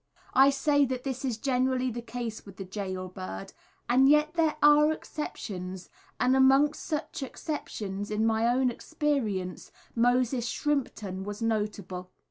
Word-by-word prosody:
I 270 +1 +7
say 285 +1 +3
that 255 -1 -3
this 265 -1 -4
is 250 -5 -1
generally 255 0 +1
the 240 +1 -5
case 235 -1 -5
with 195 -2 -13
the 195 - -6
gaol 185 -1 -4
bird; 185 +1 -7 0.3
and 265 +3 +5
yet 300 +1 +4
there 320 -3 +1
are 295 +1 +7
exceptions, 190 - -6 0.3
and 255 +1 +3
amongst 270 +3 +4
such 305 -2 -3
exceptions 210 -8 -5
in 215 +1 0
my 225 +1 +2
own 250 +1 +2
experience, 230 - -2 0.2
Moses 245 0 +2
Shrimpton 220 -10 -2
was 205 +3 -5
notable. 205 -5 -2
245 Hz, 140 wpm, -28 LUFS, 205-275 Hz, 0.3 s, I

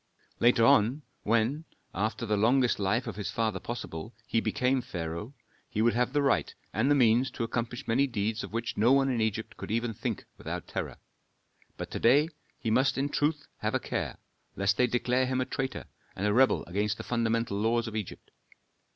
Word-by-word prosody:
Later 120 -1 +5
on, 120 +8 +4 0.2
when, 115 +8 +1 0.3
after 110 +3 -1
the 105 -1 +1
longest 120 +4 +3
life 105 +5 +1
of 110 -4 -6
his 105 - -3
father 110 -1 -1
possible, 110 -3 -6
he 115 - +1
became 130 +1 +1
pharaoh, 90 - -5 0.3
he 105 - -3
would 120 - +4
have 125 +1 +1
the 145 0 +1
right 135 - +1 0.2
and 110 +7 +2
the 145 - +5
means 125 0 +4
to 115 - -4
accomplish 115 +1 -3
many 135 +5 +3
deeds 110 -2 -2
of - - -7
which 115 +1 -3
no 115 +4 +4
one 135 -1 +3
in 120 -3 0
Egypt 110 0 -2
could - - -7
even 115 +1 0
think - - -4
without - - -5
terror. - - -4 0.8
But - - -6
to - - -3
day 145 +7 +5 0.3
he 115 - -2
must 130 +4 +3
in 140 +1 0
truth 150 0 0
have - - -1
a - - +2
care, - - -3 0.4
lest 100 +1 +2
they 125 - +4
declare 125 +1 +1
him 130 0 0
a 130 - +1
traitor 130 0 -3 0.3
and 95 - -2
a 105 - +2
rebel 130 +3 +4
against 105 +4 -1
the - - -6
fundamental 115 -3 0
laws 115 +2 +1
of 110 - -6
Egypt. 105 -4 -6
115 Hz, 195 wpm, -29 LUFS, 110-130 Hz, 0.8 s, Later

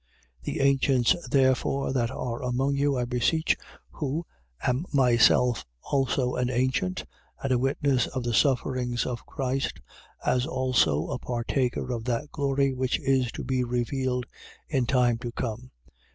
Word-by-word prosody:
5:1. - - -18
The - - -3
ancients 135 +2 +3
therefore 130 +1 +2
that 120 -3 +1
are 120 -2 -4
among 130 +3 0
you, 140 -1 +1
I 125 - 0
beseech 130 +7 +1 0.4
who 150 +3 -3 0.4
am 130 +8 0
myself 125 -2 +4 0.2
also 130 -2 0
an 125 0 0
ancient 120 - 0 0.4
and 135 - -1
a 125 - +3
witness 135 -1 +1
of 130 -2 -4
the 120 0 -1
sufferings 125 -1 +1
of 120 -2 -4
Christ, 135 -1 -2 0.5
as 125 +2 +2
also 130 - +2
a - - -2
partaker 125 +1 -1
of 115 -2 -4
that 125 +4 -2
glory 140 -2 +1
which 130 0 0
is 130 -3 +1
to - - -5
be 130 -1 0
revealed 125 +1 -1 0.4
in 130 -6 0
time 120 -3 +3
to 120 0 -5
come: 120 +1 -4 0.2
5:2. - - -26
130 Hz, 150 wpm, -27 LUFS, 120-135 Hz, 0.5 s, myself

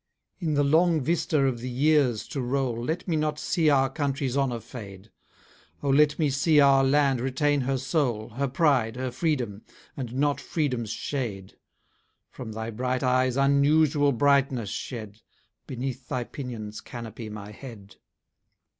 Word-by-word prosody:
In 160 -5 -1
the 145 - +3
long 160 +3 +3
vista 160 +1 0
of 130 -3 0
the 125 +2 -5
years 135 -3 +2
to 135 - -3
roll, 125 -2 -1
Let 160 +8 -3
me 170 - 0
not 155 -1 0
see 160 0 +1
our 135 -2 +4
country's 135 -2 -2
honour 135 -4 0
fade: 100 -3 -10 0.7
O 140 - +1
let 150 +1 +4
me 150 -4 +1
see 150 +3 +3
our 135 -1 +6
land 135 -2 +3
retain 140 +3 +1
her 135 +1 0
soul, 130 -6 -1
Her 135 +5 -2
pride, 130 -5 +2
her 130 0 -3
freedom; 125 - -2 0.3
and 125 -3 -5
not 145 +1 +1
freedom's 130 -8 -2
shade. 110 -6 -4 0.8
From 110 - -8
thy 110 +1 -4
bright 125 +3 -2
eyes 130 0 +2
unusual 145 +1 +3
brightness 135 -4 +2
shed 110 -3 -6 0.5
Beneath 130 0 -5
thy 125 -1 -1
pinions 115 -5 -7
canopy 115 -2 -8
my 105 -1 -8
head! 105 -4 -11
135 Hz, 150 wpm, -26 LUFS, 120-145 Hz, 0.8 s, our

